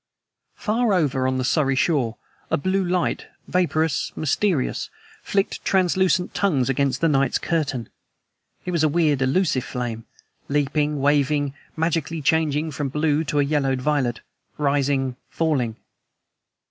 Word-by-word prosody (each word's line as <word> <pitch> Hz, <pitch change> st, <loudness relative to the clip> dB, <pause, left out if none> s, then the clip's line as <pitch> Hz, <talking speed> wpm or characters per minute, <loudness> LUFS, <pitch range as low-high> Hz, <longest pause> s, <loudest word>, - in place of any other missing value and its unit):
Far 225 Hz, -1 st, +1 dB
over 135 Hz, -6 st, +1 dB
on 130 Hz, 0 st, 0 dB
the 130 Hz, -, -1 dB
Surrey 135 Hz, 0 st, +2 dB
shore 130 Hz, -6 st, +1 dB, 0.3 s
a -, -, +2 dB
blue 185 Hz, +6 st, 0 dB
light 180 Hz, 0 st, -1 dB, 0.2 s
vaporous, 160 Hz, -4 st, 0 dB
mysterious 155 Hz, 0 st, 0 dB, 0.3 s
flicked 195 Hz, 0 st, -1 dB
translucent 185 Hz, -1 st, +2 dB
tongues 140 Hz, -10 st, +1 dB
against 135 Hz, 0 st, 0 dB
the 165 Hz, -, +4 dB
night's 140 Hz, -4 st, +2 dB
curtain. 140 Hz, -8 st, -2 dB, 0.8 s
It 180 Hz, -, -2 dB
was 170 Hz, -3 st, +1 dB
a 155 Hz, -, +4 dB
weird, 150 Hz, -3 st, +2 dB
elusive 135 Hz, -1 st, +1 dB
flame, 120 Hz, -4 st, -4 dB, 0.4 s
leaping, 145 Hz, 0 st, 0 dB
wavering, 145 Hz, 0 st, +2 dB, 0.2 s
magically 165 Hz, 0 st, -1 dB
changing 155 Hz, 0 st, +1 dB
from 140 Hz, -1 st, -3 dB
blue 150 Hz, +2 st, +1 dB
to 145 Hz, 0 st, 0 dB
a -, -, +4 dB
yellowed 140 Hz, -2 st, 0 dB
violet, 130 Hz, -4 st, 0 dB, 0.4 s
rising, 140 Hz, -3 st, 0 dB
falling. 135 Hz, -9 st, 0 dB
145 Hz, 130 wpm, -23 LUFS, 135-165 Hz, 0.8 s, the